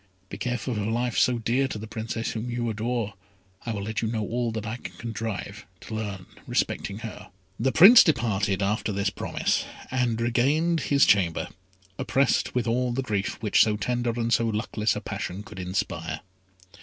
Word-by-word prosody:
Be -, -, -6 dB
careful 125 Hz, 0 st, -2 dB
of 105 Hz, -, -2 dB
a 105 Hz, -, -1 dB
life 120 Hz, +1 st, -1 dB
so 125 Hz, -1 st, +3 dB
dear 120 Hz, +4 st, +1 dB
to 130 Hz, -, -5 dB
the 105 Hz, -, -6 dB
Princess 110 Hz, +1 st, -4 dB
whom 115 Hz, +2 st, -4 dB
you 120 Hz, 0 st, -2 dB
adore. 110 Hz, -1 st, -2 dB, 0.5 s
I -, -, 0 dB
will 100 Hz, -3 st, -3 dB
let 110 Hz, -1 st, -2 dB
you 115 Hz, -, 0 dB
know 110 Hz, -1 st, -1 dB
all 120 Hz, +2 st, -1 dB
that 110 Hz, -1 st, -4 dB
I 110 Hz, +2 st, -3 dB
can -, -, -9 dB
contrive 115 Hz, -2 st, -5 dB, 0.2 s
to -, -, -8 dB
learn 100 Hz, -4 st, -4 dB, 0.2 s
respecting 100 Hz, -, -1 dB
her." 105 Hz, -1 st, -8 dB, 0.3 s
The 130 Hz, +4 st, +2 dB
Prince 200 Hz, -, +10 dB
departed 105 Hz, -, +1 dB
after 105 Hz, +2 st, 0 dB
this 100 Hz, 0 st, 0 dB
promise, -, -, -1 dB, 0.3 s
and 125 Hz, -3 st, 0 dB
regained 140 Hz, +8 st, +2 dB
his 140 Hz, -1 st, +5 dB
chamber, 90 Hz, -5 st, +2 dB, 0.5 s
oppressed 135 Hz, -1 st, +1 dB
with 125 Hz, -2 st, +1 dB
all 125 Hz, +2 st, +1 dB
the 135 Hz, +2 st, -1 dB
grief 100 Hz, -4 st, -2 dB
which 105 Hz, -, +4 dB
so 105 Hz, -1 st, +3 dB
tender 120 Hz, +2 st, -1 dB
and 115 Hz, 0 st, +1 dB
so 115 Hz, +1 st, +3 dB
luckless 110 Hz, 0 st, 0 dB
a -, -, -4 dB
passion 95 Hz, +3 st, -5 dB
could 95 Hz, -, -10 dB
inspire. 90 Hz, +1 st, -3 dB
115 Hz, 185 wpm, -26 LUFS, 105-120 Hz, 0.5 s, Prince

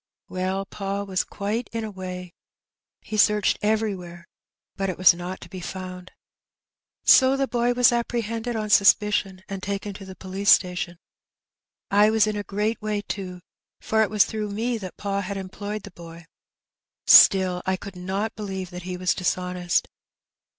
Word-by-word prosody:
Well, 185 Hz, +1 st, -2 dB
pa 200 Hz, 0 st, -4 dB
was 190 Hz, -2 st, -1 dB
quite 210 Hz, +4 st, -4 dB
in 230 Hz, 0 st, -3 dB
a 215 Hz, -, -5 dB
way. 180 Hz, -2 st, -7 dB, 0.7 s
He 215 Hz, -, -5 dB
searched 210 Hz, -1 st, +3 dB
everywhere, 195 Hz, -5 st, -2 dB, 0.5 s
but 195 Hz, -1 st, -2 dB
it 185 Hz, -, -4 dB
was 185 Hz, -2 st, +7 dB
not 175 Hz, +2 st, -6 dB
to -, -, -10 dB
be 190 Hz, -, -8 dB
found. 185 Hz, 0 st, -7 dB, 0.9 s
So 265 Hz, 0 st, +6 dB
the 275 Hz, 0 st, 0 dB
boy 240 Hz, 0 st, +1 dB
was 245 Hz, 0 st, +5 dB
apprehended 235 Hz, 0 st, -2 dB
on 215 Hz, -1 st, -3 dB
suspicion, 200 Hz, -2 st, +3 dB
and 195 Hz, -1 st, -6 dB
taken 200 Hz, +1 st, -4 dB
to 195 Hz, -, -10 dB
the 190 Hz, 0 st, -10 dB
police 190 Hz, +2 st, -3 dB
station. 180 Hz, -1 st, +3 dB, 0.9 s
I 205 Hz, +1 st, +5 dB
was 220 Hz, -1 st, +3 dB
in 215 Hz, -1 st, -2 dB
a 205 Hz, -, -2 dB
great 210 Hz, +3 st, -2 dB
way, 210 Hz, -1 st, -2 dB
too, 185 Hz, -3 st, -6 dB, 0.4 s
for 220 Hz, 0 st, +1 dB
it 220 Hz, -, +2 dB
was 210 Hz, -1 st, +4 dB
through 215 Hz, -2 st, -4 dB
me 225 Hz, +3 st, -2 dB
that 185 Hz, -3 st, -8 dB
pa 200 Hz, -1 st, -2 dB
had 200 Hz, +1 st, -5 dB
em 190 Hz, -1 st, -6 dB
ployed 205 Hz, +2 st, -6 dB
the 205 Hz, -, -10 dB
boy; 170 Hz, -1 st, -12 dB, 0.8 s
still, 185 Hz, -2 st, +7 dB
I 190 Hz, 0 st, +1 dB
could 195 Hz, 0 st, -10 dB
not 190 Hz, +4 st, -3 dB
believe 190 Hz, -4 st, -5 dB
that 180 Hz, 0 st, -7 dB
he 180 Hz, -, -4 dB
was 180 Hz, 0 st, +1 dB
dishonest. 180 Hz, 0 st, -1 dB
195 Hz, 170 wpm, -24 LUFS, 185-215 Hz, 0.9 s, was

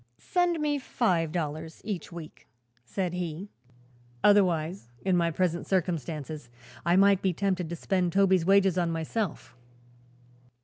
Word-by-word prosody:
"Send 355 Hz, -2 st, 0 dB
me 295 Hz, -1 st, 0 dB
five 180 Hz, -, 0 dB
dollars 160 Hz, -1 st, -4 dB
each 195 Hz, -7 st, -5 dB
week," 165 Hz, -2 st, -10 dB, 0.4 s
said 180 Hz, +7 st, -3 dB
he. 180 Hz, +2 st, -4 dB, 0.7 s
"Otherwise, 180 Hz, -, +3 dB, 0.2 s
in 190 Hz, -2 st, +3 dB
my 170 Hz, -1 st, +2 dB
present 170 Hz, +1 st, -1 dB
circumstances, 155 Hz, -6 st, -2 dB, 0.3 s
I 170 Hz, +1 st, +3 dB
might 195 Hz, 0 st, +5 dB
be 190 Hz, -2 st, +1 dB
tempted 185 Hz, -2 st, -1 dB
to 170 Hz, -, -3 dB
spend 180 Hz, +1 st, 0 dB
Toby's 190 Hz, -1 st, +4 dB
wages 195 Hz, 0 st, +4 dB
on 170 Hz, -1 st, +1 dB
myself." 165 Hz, -, -3 dB
180 Hz, 130 wpm, -28 LUFS, 165-195 Hz, 0.7 s, might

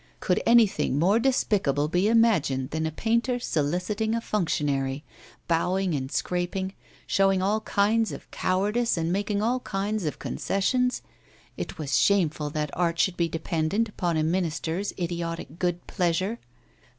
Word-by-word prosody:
Could -, -, +1 dB
anything 225 Hz, -, +4 dB
more 190 Hz, +8 st, +3 dB
despicable 195 Hz, -, +1 dB
be 180 Hz, +5 st, +1 dB
imagined 185 Hz, -, +2 dB
than 160 Hz, 0 st, -1 dB
a -, -, -3 dB
painter 235 Hz, -, 0 dB
soliciting 185 Hz, +4 st, -1 dB
a -, -, 0 dB
functionary, 145 Hz, -10 st, -1 dB, 0.4 s
bowing 180 Hz, +2 st, +1 dB
and 135 Hz, -2 st, -3 dB
scraping, 180 Hz, +2 st, -2 dB, 0.3 s
showing 195 Hz, -1 st, +3 dB
all 205 Hz, +4 st, +1 dB
kinds 215 Hz, +2 st, +1 dB
of -, -, -9 dB
cowardice 210 Hz, +5 st, 0 dB
and 165 Hz, +1 st, 0 dB
making 205 Hz, +1 st, -1 dB
all 245 Hz, +3 st, +1 dB
kinds 205 Hz, -2 st, -2 dB
of 150 Hz, -, -2 dB
concessions? 250 Hz, +6 st, 0 dB, 0.5 s
It -, -, -6 dB
was 145 Hz, -4 st, 0 dB
shameful 160 Hz, -7 st, +2 dB
that 150 Hz, -1 st, -3 dB
art 170 Hz, -1 st, 0 dB
should 185 Hz, +1 st, +2 dB
be 170 Hz, -1 st, 0 dB
dependent 165 Hz, +7 st, -1 dB
upon 175 Hz, -5 st, -1 dB
a 155 Hz, -, +1 dB
Minister's 170 Hz, +2 st, -1 dB
idiotic 170 Hz, -2 st, -4 dB
good 175 Hz, -1 st, -1 dB
pleasure! 185 Hz, +5 st, -1 dB
180 Hz, 140 wpm, -26 LUFS, 160-210 Hz, 0.5 s, anything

